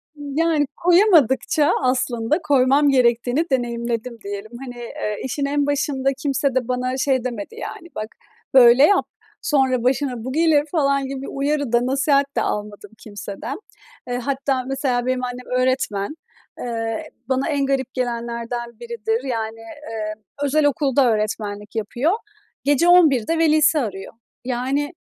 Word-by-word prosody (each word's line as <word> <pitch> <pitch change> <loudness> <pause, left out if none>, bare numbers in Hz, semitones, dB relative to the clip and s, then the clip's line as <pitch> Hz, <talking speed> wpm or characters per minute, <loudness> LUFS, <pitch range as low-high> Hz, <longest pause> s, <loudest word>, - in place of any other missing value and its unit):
Iıı, 290 -2 -7
yani, 320 -3 +2
koyamadıkça 330 - +4
aslında 255 +2 0
koymam 280 +1 +3
gerektiğini 245 +3 +2
deneyimledim, 235 -1 -2
diyelim. 200 +2 -6
Hani, 245 -1 -8
ııı, 210 -3 -5
işin 280 +3 -2
en 285 0 +1
başında 275 -1 0
kimse 275 -1 -1
de 255 -2 0
bana 255 +1 -1
şey 260 -2 +1
demedi 235 -5 -5
yani: 340 - -7
"Bak, 215 - -4 0.5
böyle 250 +1 +8
yap; 405 - +4 0.4
sonra 265 -5 +1
başına 255 -2 0
bu 260 - -4
gelir." 310 -1 +3
falan 275 -4 +1
gibi 270 0 -5
bir - - -6
uyarı 285 -2 -1
da, 240 +1 +3
nasihat 275 +1 +2
de - - +1
almadım 205 0 -4
kimseden. 205 - -7 0.5
Eee, 245 0 -2
hatta 265 0 -1
mesela 255 -2 -1
benim 255 0 -1
annem 250 0 -5 0.2
öğretmen. 255 -1 -1 0.4
Eee, 225 -2 -3 0.2
bana 265 +4 0
en 280 -2 +1
garip 265 -2 -1
gelenlerden 235 -1 -4
biridir. 235 0 -2
Yani, 225 -3 -3
eee, 225 -3 -6 0.3
özel 290 +1 +2
okulda 275 -3 +3
öğretmenlik 210 0 -3
yapıyor, 240 - 0 0.5
gece 290 +4 +3
23.00'de 325 -5 +5
velisi 310 -1 +4
arıyor. 195 -6 -5 0.3
Yani, 265 +5 -1
260 Hz, 140 wpm, -21 LUFS, 235-285 Hz, 0.5 s, böyle